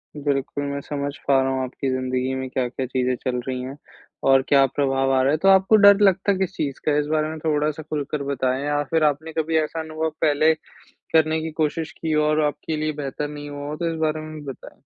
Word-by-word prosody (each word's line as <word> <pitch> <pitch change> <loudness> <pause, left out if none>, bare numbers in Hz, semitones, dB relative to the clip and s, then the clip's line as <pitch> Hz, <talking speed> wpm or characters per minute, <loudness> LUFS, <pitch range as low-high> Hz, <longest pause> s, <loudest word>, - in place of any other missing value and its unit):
बिल्कुल, 145 -1 -2
मैं 140 0 -3
समझ 145 0 -3 0.2
पा 135 -1 +5
रहा 135 0 0
हूँ 130 0 -1
आपकी 130 +1 -3
ज़िंदगी 130 0 -1
में 130 0 -4
क्या-क्या 130 0 -2
चीज़ें 130 0 0
चल 125 -2 -1
रही 130 -1 -2
हैं 135 +3 -7 0.5
और 135 0 +6
क्या 140 -1 +6
प्रभाव 135 -1 +1
आ 130 - +3
रहा 135 +2 +3
है। 155 - +2
तो 195 - 0
आपको 195 +2 +5
डर 200 -1 +7
लगता 195 0 +4
है 190 - 0
किस 190 -2 -1
चीज़ 140 -2 -3
का 150 -1 +2
इस 150 - +1
बारे 155 0 +1
में 160 - -6
थोड़ा-सा 150 0 -1
खुलकर 145 -1 -3
बताएँ 130 0 -1
या 145 0 +1
फिर 160 -1 +2
आपने 155 +2 0
कभी 160 0 0
ऐसा 155 +1 -1
अनुभव 160 0 -2
पहले 155 +1 +4 0.6
करने 160 0 +3
की 160 0 -4
कोशिश 160 +1 -2
की 160 -1 -1
और 155 0 +2
आपके 150 +1 -2
लिए 155 0 -1
बेहतर 140 +2 -3
नहीं 145 0 -8
हुआ 145 0 -6
हो 150 - -4
तो 170 -1 -1
इस - - -5
बारे 155 0 0
में 155 0 -8
भी 150 - -8
बताएँ? - - -14
145 Hz, 235 wpm, -23 LUFS, 135-160 Hz, 0.6 s, डर